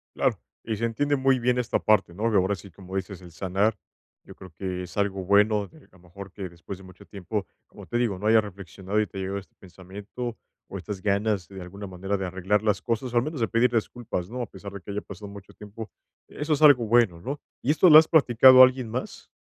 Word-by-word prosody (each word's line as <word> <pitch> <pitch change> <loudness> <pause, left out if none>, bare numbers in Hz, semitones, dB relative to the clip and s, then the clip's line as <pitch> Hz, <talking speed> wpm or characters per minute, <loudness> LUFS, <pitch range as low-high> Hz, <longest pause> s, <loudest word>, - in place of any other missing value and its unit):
Claro, - - 0 0.2
y 110 - -3
se 115 +3 -2
entiende 145 +6 0
muy 135 -1 +2
bien 125 +1 +1
esta 125 - -1
parte, 105 -5 +2
¿no? 110 +6 -1
De 105 - +3
ahora 95 +2 +1
sí, 100 0 -13
como 95 +2 -11
dices, 95 0 -5
el 90 -2 -13
sanar, 100 +5 -1 0.5
yo - - -14
creo 95 - -13
que 90 -2 -4
es 90 +1 -11
algo 100 -2 -1
bueno, 105 +2 +3
de 160 - -19
que, - - -21
a - - -29
lo - - -23
mejor 90 +2 -12
que 95 -1 -7
después 85 +3 -9
de 95 - -15
mucho 95 -1 -15
tiempo, 100 0 -5 0.2
como - - -13
te 120 - -2
digo, 115 -6 0
¿no?, 105 - -2
haya 110 0 +5
reflexionado 100 0 -5
y 105 - 0
te 95 - -11
ha - - -3
llegado 95 +1 -3
este 95 - -18
pensamiento, 100 +6 -8 0.3
o 95 - -5
estas 95 +1 -7
ganas, 100 -2 0
de 95 -1 -10
alguna 100 +3 -9
manera, 95 +2 -3
de 95 - -4
arreglar 95 +3 0
las 105 -2 0
cosas, 120 +1 -3
o - - +1
al 120 - +3
menos 155 0 -5
de 115 - +2
pedir 115 +1 +2
disculpas, 115 -5 -3
¿no?, 125 +2 -5
a - - -2
pesar 100 +1 -10
de 100 - -8
que 100 - -8
haya 105 +1 -3
pasado 105 - -10
mucho 100 -1 -12
tiempo, 105 +1 -10 0.4
eso 150 +1 -3
es 145 - -1
algo 140 -6 +6
bueno, 110 -7 +2
¿no? 140 +9 -5 0.2
¿Y 135 - +1
esto 165 +4 +5
lo 155 - +10
has 160 - +2
platicado 130 -3 +7
a - - +12
alguien 130 -2 -2
más? 125 +4 -6
105 Hz, 255 wpm, -25 LUFS, 95-120 Hz, 0.5 s, a